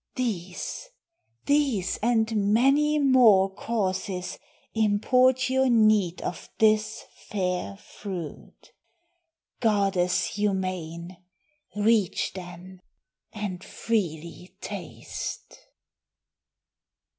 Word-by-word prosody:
These, 220 - -4 0.6
these, 280 -10 +1
and 220 -3 +1
many 290 +5 +3
more 235 -9 +5
Causes 190 -3 -3 0.3
import 250 +5 +3
your 265 0 +2
need 215 -6 +3
of 170 - -5
this 215 0 +2 0.2
fair 185 -1 -2
fruit. 190 -5 -9 0.9
Goddess 195 -5 +2
humane, 185 -4 -3 0.6
reach 210 -2 +1
then, 180 0 -10 0.5
and 205 -4 -5
freely 175 -5 -3
taste." - - -7
205 Hz, 70 wpm, -26 LUFS, 185-230 Hz, 0.9 s, more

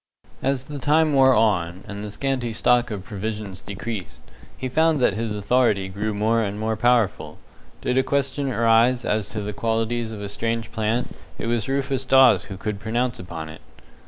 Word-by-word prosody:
As 135 -1 0
the 145 +1 -7
time 155 +3 +3
wore 130 -1 +6
on, 95 -5 +1
and 100 -1 -6
the 105 - -5
scanty 125 0 -2
stock 120 +2 +2
of 105 -4 -5
provisions 105 -1 -5
decreased, 100 - -6 0.4
he 130 - -3
found 160 +3 +2
that 125 - +3
his 110 0 -3
authority 105 -2 +1
grew 105 +3 -3
more 110 +3 +1
and 105 -1 -3
more 110 0 -1
powerful. 120 -2 +1 0.4
Did 125 +1 +1
a - - +3
question 140 0 -1
arise 115 +2 +3
as 105 -1 0
to 110 - -4
the 105 0 -4
qualities 115 +1 -1
of 110 - -7
a 100 - -4
strange 115 +2 -3
plant, 110 +2 -1 0.2
it - - -5
was 115 0 -1
Rufus 135 -1 -1
Dawes 130 -1 +5
who 95 - -8
could 105 +1 -4
pronounce 120 +4 -1
upon 85 -3 -7
it. 80 +1 -11
115 Hz, 185 wpm, -23 LUFS, 105-125 Hz, 0.4 s, wore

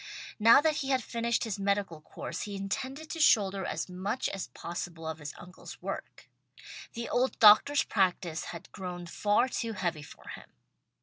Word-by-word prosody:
Now 230 +6 +8
that 310 -1 +2
he 275 -2 -3
had 260 -3 +2
finished 235 0 -1
his 215 -4 -3
medical 200 -5 -1
course - - -6
he 205 -1 -5
intended 260 +10 -4
to 330 - -5
shoulder 200 -9 +4
as - - -3
much 190 +7 -2
as 195 -8 -5
possible 170 +4 -6
of 160 0 -4
his 150 -1 -6
uncle's 180 +1 -11
work. - - -7 0.7
The 235 0 -4
old 255 +2 0
doctor's 230 +8 +7
practice 180 -5 0
had 170 +1 -9
grown 180 -2 -6
far 205 +7 +2
too 230 -3 -3
heavy 175 -6 -2
for 145 - -13
him. - - -10
200 Hz, 170 wpm, -30 LUFS, 175-235 Hz, 0.7 s, Now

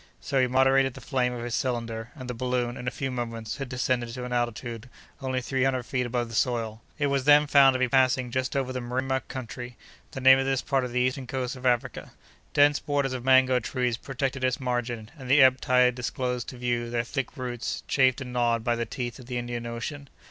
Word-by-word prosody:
So 135 -1 0
he 130 - +3
moderated 135 +1 +3
the - - -8
flame 125 -3 0
of 120 -1 -5
his 120 -1 -4
cylinder, 115 -3 -2
and 130 -4 -8
the 125 - -3
balloon, 125 0 -1
in 125 - -7
a - - +4
few 135 +1 -4
moments, 115 -2 -4
had 135 -2 -5
descended 125 -1 -1
to 125 -1 -5
an 125 - -5
altitude 120 0 -3 0.3
only 130 -1 -1
three 130 +1 -1
hundred 130 -2 +1
feet 125 0 -2
above 120 0 -1
the 115 - -10
soil. 115 -2 -1 0.2
It 145 - 0
was 140 -2 0
then 150 0 +7
found 140 -2 +6
to - - 0
be 130 - +2
passing 130 -1 +2
just 130 +1 -2
over 130 -2 -1
the 125 - -3
Mrima 130 +2 -1
country, 125 -1 -7 0.3
the - - -7
name 130 0 +7
of 135 - 0
this 135 -1 0
part 135 -2 +1
of 125 - -4
the 125 +1 +1
eastern 130 +1 -1
coast 130 0 -3
of 130 0 -3
Africa. 125 0 -1 0.4
Dense 145 0 +5
borders 140 -2 -1
of 125 -2 -4
mango 130 -1 +5
trees 125 0 -1
protected 135 +1 -3
its 130 0 +1
margin, 120 -3 -3
and 130 -1 -8
the 140 +1 +7
ebb 130 0 +5
tide 125 0 +4
disclosed 125 0 -3
to 130 - -9
view 120 -1 -1
their 120 0 0
thick 135 +3 -4
roots, 125 -2 -4
chafed 130 -1 +3
and 125 -1 -6
gnawed 120 -2 +1
by 120 +1 +1
the 115 0 -3
teeth 120 -1 -5
of 125 - -12
the 125 -1 -3
Indian 120 -1 -4
Ocean. 135 +5 -6
125 Hz, 230 wpm, -27 LUFS, 120-130 Hz, 0.4 s, then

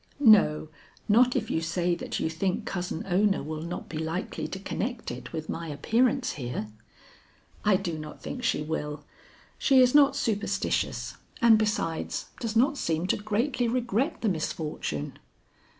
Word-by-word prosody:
"No, 155 -6 +2 0.4
not 245 +4 +5
if 215 - -1
you 160 - 0
say 175 +2 0
that 170 - -3
you - - 0
think 180 +4 -1
Cousin 180 -3 -3
Ona 195 0 +2
will 155 +1 -5
not 170 +2 -5
be 155 - -5
likely 160 +3 -3
to - - -5
connect 225 +5 -4
it - - -8
with 160 -1 -5
my 165 0 -4
appearance 240 - +1
here." 120 -5 -4 0.9
"I 205 -2 +4
do 175 -5 -2
not 155 0 -8
think 250 - -6
she 190 -10 +1
will; 150 -1 -4 0.6
she 270 -2 +5
is 250 -1 +5
not 285 -2 +6
superstitious 220 -6 -1 0.2
and 230 -4 +6
besides 210 -7 -1
does 230 -2 -3
not 275 +5 +3
seem 165 +1 0
to - - +4
greatly 235 +5 0
regret 245 +4 0
the 225 - +2
misfortune." 155 - -3
195 Hz, 155 wpm, -28 LUFS, 160-235 Hz, 0.9 s, not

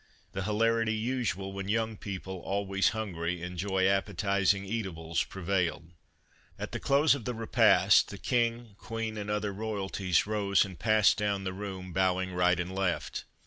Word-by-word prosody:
The 95 - -4
hilarity 115 +2 +1
usual 110 -5 -2
when 100 -1 -5
young 110 +1 0
people, 95 -2 -6
always 100 +1 0
hungry, 90 -5 -3
enjoy 95 +2 -1
appetizing 100 0 +1
eatables 90 -6 -2
prevailed. 90 -3 -2 0.7
At - - -5
the - - -3
close 140 +2 +4
of 135 -6 -5
the 125 - -2
repast 115 0 +4
the - - -7
King, 120 -2 0
Queen 115 -1 -4
and 105 -1 -5
other 105 -1 -1
royalties 100 -4 -1
rose 100 -2 +2
and 95 -4 -10
passed 110 -2 +4
down 100 -2 -1
the 95 -1 -3
room, 95 -2 -6
bowing 95 0 +1
right 90 0 +3
and 90 +1 -3
left. 95 -2 -2
100 Hz, 150 wpm, -30 LUFS, 95-110 Hz, 0.7 s, close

